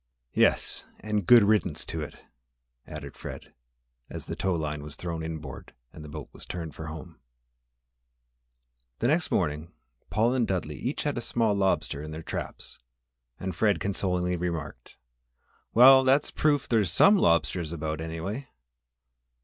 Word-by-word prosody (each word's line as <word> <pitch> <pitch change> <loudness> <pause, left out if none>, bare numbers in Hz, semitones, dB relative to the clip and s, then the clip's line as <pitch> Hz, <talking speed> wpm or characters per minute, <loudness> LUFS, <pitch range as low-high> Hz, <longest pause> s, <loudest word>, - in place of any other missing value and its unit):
"Yes, - - +2 0.2
and 105 -4 -2
good 120 -3 +9
riddance 105 +1 +1
to 80 - -3
it!" 75 - -8 0.6
added - - -8
Fred, - - -9 0.6
as - - -7
the - - -5
tow 95 -2 0
line 75 -2 -3
was 75 0 -8
thrown 85 -2 -4
inboard 80 -4 -7 0.2
and 75 - -10
the 75 - -9
boat 75 -1 -7
was - - -9
turned 85 -3 -6
for 80 - -7
home. 80 +1 -9 1.8
The 100 - 0
next 160 +3 +2
morning 75 -2 -1 0.4
Paul 115 +3 +2
and 125 -4 +1
Dudley 85 -5 -2
each 130 - -2
had 145 -4 -1
a - - -5
small 115 -2 +1
lobster 80 -7 0
in 75 - -7
their 80 +1 -7
traps - - -6 0.6
and 95 -2 -4
Fred 100 -1 +2
consolingly 90 -1 -1
remarked, 85 -8 -5 0.7
"Well, 130 +3 +8
that's 135 +2 +3
proof 145 -3 +1
there's 105 -7 +2
some 200 - +6
lobsters 85 - +2
about, 80 -1 -3
anyway." 85 +11 -5
90 Hz, 150 wpm, -27 LUFS, 80-110 Hz, 1.8 s, good